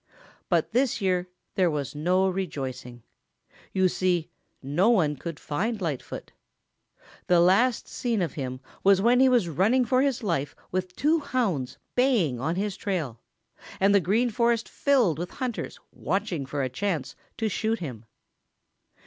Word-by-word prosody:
But - - +1
this 250 +1 +1
year 185 -2 0 0.2
there 185 -2 +3
was 145 -3 -3
no 180 +6 +2
rejoicing. 130 -10 -4 0.7
You 190 -1 +3
see, 180 -2 0 0.3
no 160 - +2
one 165 -11 +3
could 165 +2 -7
find 210 +9 -2
Lightfoot. 160 -8 -5 1.0
The 175 -1 +5
last 205 +8 +3
seen 235 -4 -1
of 160 - -3
him 130 -2 -5 0.2
was 195 -1 +6
when 240 +5 +4
he 265 0 +6
was 240 -8 +3
running 210 - +2
for 255 +2 +3
his 270 -4 0
life 165 -8 -1 0.2
with 185 0 -3
two 315 +3 +2
hounds 190 - -1 0.2
baying 225 - +2
on 160 +7 -1
his 200 0 -2
trail 160 - -3 0.6
and 195 +1 +4
the 200 - +6
Green 220 +8 +1
Forest 235 0 +1
filled 240 - +2
with 175 +1 -3
hunters 255 -4 -4
watching 185 -8 -2
for 140 0 -2
a - - 0
chance 160 0 -2 0.2
to 225 - 0
shoot 220 +2 0
him. 125 - -7
185 Hz, 150 wpm, -26 LUFS, 150-230 Hz, 1.0 s, was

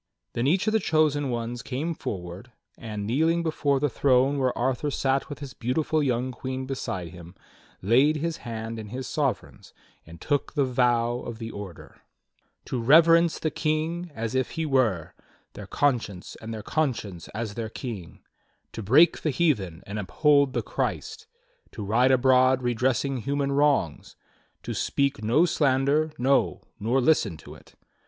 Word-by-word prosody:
Then 120 +2 0
each 180 +7 +2
of 215 - +1
the 220 - +4
chosen 155 -5 +1
ones 120 0 -3
came 140 +8 -3
forward, 95 - -7 0.2
and 105 -3 -6
kneeling 160 +9 +1
before 145 -4 0
the 145 - +2
throne 135 +1 +2
where 130 -2 0
Arthur 130 +4 0
sat 135 0 0
with 145 - -6
his 140 -3 -8
beautiful 155 +6 0
young 130 -2 0
queen 130 +1 -5
beside 95 -10 -4
him, 85 0 -12 0.5
laid 130 +9 +4
his 165 +2 -2
hand 115 -1 -6
in 110 - -7
his 125 +4 -6
sovereign's - - -3 0.3
and 80 +1 -13
took 145 - -1
the 145 -3 +2
vow 120 -1 +1
of 120 -2 -7
the 115 0 -6
Order: 100 -4 -10 0.6
"To 125 - -3
reverence 165 +5 +5
the 155 - -2
King 160 +4 -2
as 115 +1 -3
if 130 -1 0
he 160 - 0
were 120 - +1 0.4
Their - - -9
conscience, 120 -10 -1
and 110 0 -7
their 110 -2 -6
conscience 115 - -2
as 110 -2 -3
their 110 0 -4
King, 105 -8 -8 0.5
To 115 - -6
break 135 - +4
the 155 - 0
heathen 105 - 0
and 105 +2 -5
uphold 140 +6 +2
the - - -1
Christ, 445 - -4 0.5
To 105 - -6
ride 120 +6 +3
abroad 130 0 +4
redressing 130 +2 0
human 140 +3 -1
wrongs. 140 - +1 0.5
To - - -4
speak 140 -5 -1
no 125 +11 +4
slander, 145 0 +2
no, 135 +3 +1 0.2
nor 120 +6 +1
listen 115 - +2
to 75 - -12
it. - - -18
130 Hz, 160 wpm, -26 LUFS, 115-145 Hz, 0.6 s, reverence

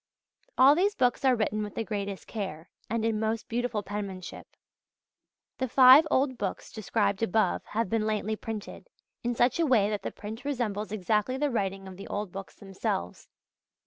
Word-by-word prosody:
All 270 +2 +8
these 390 +6 +1
books 250 +1 +1
are 260 -2 +5
written 215 -1 -1
with 210 -1 -5
the 225 - -1
greatest 200 -3 -4
care, 190 -6 -6 0.2
and 225 +1 -1
in 220 -1 0
most 220 0 -2
beautiful 240 -3 -2
penmanship. 195 -3 -6 1.1
The 260 - 0
five 260 +5 +8
old 260 -2 +1
books 195 - -4
described 205 -2 -1
above 220 0 +1
have 225 +1 -1
been 220 +2 0
lately 215 0 -1
printed, 220 - -7 0.3
in 240 0 -1
such 240 +6 +2
a 335 - +3
way 215 -6 +3
that 205 -2 -2
the - - -3
print 220 +3 -8
resembles 225 -7 -2
exactly 215 +5 0
the 290 0 0
writing 195 -4 -2
of 185 -1 -10
the 195 - -9
old 205 -2 -4
books 195 0 -8
themselves. 190 - -4
215 Hz, 175 wpm, -28 LUFS, 200-245 Hz, 1.1 s, All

